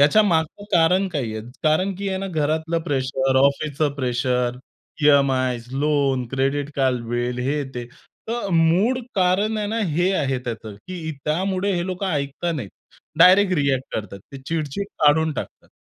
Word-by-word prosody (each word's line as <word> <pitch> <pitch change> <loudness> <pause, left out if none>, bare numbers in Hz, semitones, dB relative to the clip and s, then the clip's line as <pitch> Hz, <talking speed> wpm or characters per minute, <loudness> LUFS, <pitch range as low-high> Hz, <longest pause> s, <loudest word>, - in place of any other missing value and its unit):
याच्या 150 +10 +6
मागचं 170 +1 0
कारण 180 +3 +4
काय 155 -6 -2
आहे? 110 - -4 0.2
कारण 175 +5 +2
की 200 +2 -4
आहे 190 0 -2
ना 195 - -3
घरातलं 160 +1 0
प्रेशर, 135 -1 0
ऑफिसचं 140 +2 +2
pressure, 125 -2 0 0.5
EMIs, 130 -4 +3
loan, 140 -3 +1
credit 135 +2 -1
card 130 -3 +1
bill 120 +1 -2
हे 145 0 0
ते. 120 -1 -4 0.4
तर 235 -3 -2
मूळ 175 +10 +3 0.2
कारण 200 +3 +2
आहे 210 - -1
ना 225 +2 -2 0.2
हे 175 +4 +2
आहे 135 -6 0
त्याचं, 115 -3 -6
की 160 - -7
त्यामुळे 185 +5 0
हे 175 0 -1
लोकं 185 +1 -3
ऐकत 140 -2 -3
नाहीत. 115 -10 -5 0.5
डायरेक्ट 185 +3 +6
रिअ‍ॅक्ट 140 -3 +1
करतात. 100 -2 -5
ते 135 - -7
चिड-चिड 160 +4 -2 0.2
काढून 155 +1 +4
टाकतात. - - -7
150 Hz, 155 wpm, -22 LUFS, 135-185 Hz, 0.5 s, याच्या